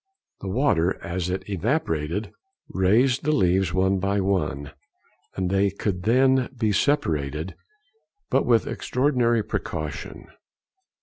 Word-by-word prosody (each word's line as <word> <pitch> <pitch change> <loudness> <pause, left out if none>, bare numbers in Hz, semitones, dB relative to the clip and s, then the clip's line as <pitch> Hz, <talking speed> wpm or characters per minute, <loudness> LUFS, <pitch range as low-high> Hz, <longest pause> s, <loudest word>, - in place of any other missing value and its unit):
The - - -7
water 95 - +1
as 85 +1 -3
it 95 +1 -3
evaporated 95 - -1 0.4
raised 120 +8 +2
the 150 - +1
leaves 95 - +2
one 95 +1 +1
by 100 +1 0
one, 80 -8 -1 0.6
and 95 -1 -1
they 100 +1 +3
could 100 -1 -3 0.6
be 110 -3 +1
separated, 80 - 0 0.8
but - - +3
with 115 -2 +3
extraordinary 125 -4 +1
precaution. - - -5
95 Hz, 110 wpm, -24 LUFS, 90-115 Hz, 0.8 s, they